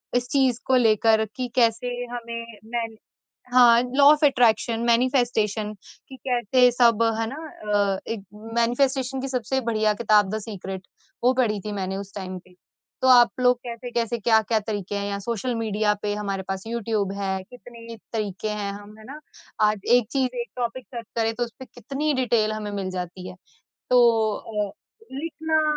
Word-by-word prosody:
इस 245 0 +1
चीज़ 260 -4 +2
को 260 - +3
लेकर 220 -1 +4
कि 250 -1 -2
कैसे 235 0 +2 0.2
हमें 235 -1 -5 0.2
मैन 230 -1 -4 0.6
हाँ, 240 -2 +7
लॉ 280 - +5
ऑफ 305 0 -2
अट्रैक्शन, 235 -4 +3
मैनिफेस्टेशन 230 -4 +1 0.4
कि 265 - -9
कैसे 250 +1 +4
सब 235 -2 +4 0.2
है 225 - 0
ना, 270 +5 -6 0.6
अ, - - -6
एक 210 -4 -4 0.3
मैनिफेस्टेशन 260 +2 +1
की 270 - -3
सबसे 260 +1 -1
बढ़िया 215 -1 +2
किताब 210 -3 +4
द - - -2
सीक्रेट 195 -3 -7 0.4
वो 255 +1 +5
पढ़ी 225 -5 +1
थी 210 - -3
मैंने 190 -1 -3
उस 200 0 -8
टाइम 185 -2 -5
पे। 180 0 -23 0.5
तो 260 - +2
आप 240 -2 +7
लोग 250 0 +4
कैसे-कैसे, 235 -1 -3
क्या-क्या 220 0 +3
तरीके 205 -2 -4
हैं 200 0 -2
या 200 - -2
सोशल 235 +2 -2
मीडिया 215 -2 +1
पे 205 0 0
हमारे 195 -2 -3
पास 190 0 -3
यूट्यूब 220 -4 -1
है, 190 -1 -2
कितने 235 0 -12 0.2
तरीके 210 -1 -3
हैं 205 -1 -3
हम, 205 +1 -11
है - - -13
ना। 285 +4 -9 0.5
आज 210 -2 -3 0.2
एक 230 -4 -1
चीज़ 255 -2 0
एक 235 - -7
टॉपिक 245 +1 -3
सर्च 230 -1 -5
करे 225 0 +1
तो 240 - -2
उसपे 245 +3 -12
कितनी 275 +6 -3
डिटेल 215 -2 +2
हमें 210 -1 -5
मिल 195 -2 -3
जाती 180 0 -6
है। 185 - -10 0.6
तो 250 0 +6 0.4
अ, 210 -2 -4 0.4
लिखना 315 +2 -1
230 Hz, 170 wpm, -24 LUFS, 210-245 Hz, 0.6 s, हाँ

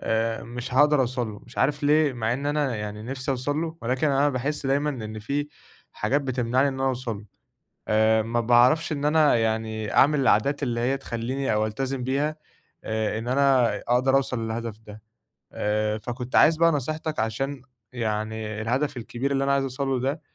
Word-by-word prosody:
آآ 115 0 -1
مش 120 +2 -6
هاقدر 145 +1 +5
أوصل 125 -2 -1
له. 105 - -10
مش 120 - -12
عارف 145 +1 +1
ليه؟ 150 -1 +3
مع 115 -1 -1
إن 140 +3 -3
أنا 145 -5 0
يعني 105 0 -5
نفسي 130 +3 -4
أوصل 135 +3 -1
له، 165 0 -3
ولكن 130 +5 0
أنا 140 +1 +3
باحس 140 +2 -2
دايمًا 145 +2 +1
إن 110 -5 -6
في 140 +7 -2 0.4
حاجات 130 +7 0
بتمنعني 130 0 +1
إن 135 - -3
أنا 130 - -2
أوصل 125 -4 -2
له. 105 - -12 0.6
آآ 110 +1 +3
ما 115 +2 -1
باعرفش 125 +8 +4
إن 145 -1 -2
أنا 150 -3 +4
يعني 110 -1 -1
أعمل 145 +1 +4
العادات 135 +3 +2
اللي 120 -1 -1
هي 130 +3 +1
تخلّيني 130 0 -3
أو 105 0 +1
ألتزم 130 +4 -3
بيها، 140 +4 0 0.5
آآ 110 0 -1
إن 115 - -5
أنا 130 -2 +3
أقدر 130 +2 +3
أوصل 125 -4 0
للهدف 110 -1 -4
ده. 110 -1 -13 0.5
آآ 105 0 0
فكنت 120 +3 -5
عايز 160 0 +6
بقى 165 +1 +4
نصيحتك 155 +2 -3
عشان 130 +5 -2 0.3
يعني 110 -2 -3
الهدف 130 +5 -1
الكبير 125 +3 -3
اللي 135 0 +1
أنا 140 0 +2
عايز 140 0 +2
أوصل 135 +1 -3
له 135 -1 0
ده 140 +5 -2
125 Hz, 185 wpm, -25 LUFS, 110-140 Hz, 0.6 s, عايز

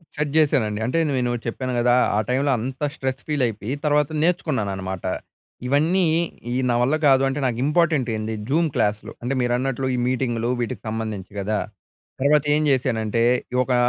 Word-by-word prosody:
Set 150 -1 -1
చేశానండి. 130 -9 +2
అంటే 130 +7 0 0.2
నేను 125 -1 0
చెప్పాను 130 +2 -3
కదా! 120 +1 +4 0.2
ఆ - - +3
టైమ్‌లో 135 +3 +2
అంత 130 +4 -5
స్ట్రెస్ 135 -2 -3
ఫీలైపోయి 125 -6 -1
తర్వాత 150 -1 +3
నేర్చుకున్నాననమాట. 100 - -1 0.6
ఇవన్నీ 160 +7 +2 0.5
ఈ - - -1
నావల్ల 120 +4 +2
కాదు 135 -1 +5
అంటే 135 +2 -2
నాకు 120 -3 0
ఇంపార్టెంటేంది 135 -9 +1 0.2
జూమ్ 165 +4 +2
క్లాస్‌లు. 105 +1 0
అంటే 125 +3 -1
మీరన్నట్లు 125 +2 0
ఈ - - -2
మీటింగ్‌లు 120 -2 -1
వీటికి 115 - -3
సంబంధించి 110 -4 -4
కదా! 105 +2 -1 0.6
తర్వాత 145 +1 +4
ఏం 150 - +2
చేశానంటే 115 -4 +1 0.3
ఈ - - -1
ఒక 130 - -1
125 Hz, 145 wpm, -23 LUFS, 115-145 Hz, 0.6 s, కాదు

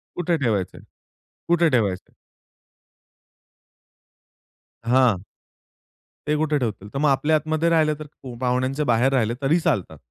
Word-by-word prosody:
कुठे 175 -1 0
ठेवायचंय, 105 -9 -1 0.7
कुठे 170 -1 +3
ठेवायचंय? 105 -9 -1 2.7
हां. 120 -6 +3 1.0
ते 150 - +2
कुठे 155 -1 +1
ठेवतील, 105 -5 -4
तर - - -3
मग 150 - +3
आपल्या 145 +3 +2
आतमध्ये 155 +2 0
राहिलं, 155 -2 +3
तर 140 -4 -10
पाहुण्यांचे 130 +3 0
बाहेर 125 +1 +2
राहिले 120 -3 +1
तरी 150 +6 +2
चालतात. 90 - -1
135 Hz, 115 wpm, -23 LUFS, 115-155 Hz, 2.7 s, कुठे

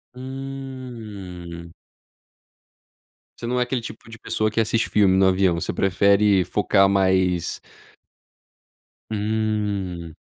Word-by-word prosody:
Hum. 120 -11 -8 1.7
Você 115 - -7
não 125 +1 0
é - - +3
aquele 125 0 -2
tipo 115 - -10
de 110 - -10
pessoa 110 0 -1
que 115 +1 +1
assiste 115 +1 0
filme 95 -3 +4
no 95 - +5
avião, 95 -2 +3
você - - -3
prefere 100 0 +3
focar 95 0 +3
mais 95 -3 +1 1.5
Hum. 105 -6 -2
100 Hz, 105 wpm, -23 LUFS, 95-115 Hz, 1.7 s, no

